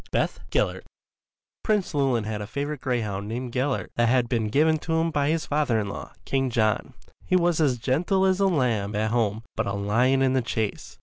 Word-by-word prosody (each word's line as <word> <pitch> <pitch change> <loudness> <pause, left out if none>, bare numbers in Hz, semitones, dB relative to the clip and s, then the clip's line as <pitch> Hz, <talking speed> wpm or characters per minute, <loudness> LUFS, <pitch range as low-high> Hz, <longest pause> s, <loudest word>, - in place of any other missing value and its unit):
Beth - - -1
Gellert - - 0 0.8
Prince 210 -6 0
Llewelyn 135 -6 +1
had 105 -1 -4
a 105 - -5
favourite 145 +3 -4
greyhound 105 -6 -2
named 120 +3 -4
Gellert 130 +1 -1
that 120 -1 +3
had 125 -1 +3
been 115 -3 0
given 155 +7 +3
to 160 - -3
him 165 +1 +1
by 145 -2 +1
his 160 0 0
father 145 -6 +1
in 100 -2 -3
law, - - -7
King 135 -1 0
John. 110 -3 0 0.3
He - - 0
was 175 -2 +2
as 135 -5 +2
gentle 170 - +1
as 190 0 +2
a 195 - +4
lamb 115 - 0
at 110 +1 0
home 110 -2 0
but - - -1
a 100 - -2
lion 120 +7 +2
in 130 -1 +2
the 130 - +2
chase. 110 -3 -3
130 Hz, 205 wpm, -25 LUFS, 110-150 Hz, 0.8 s, a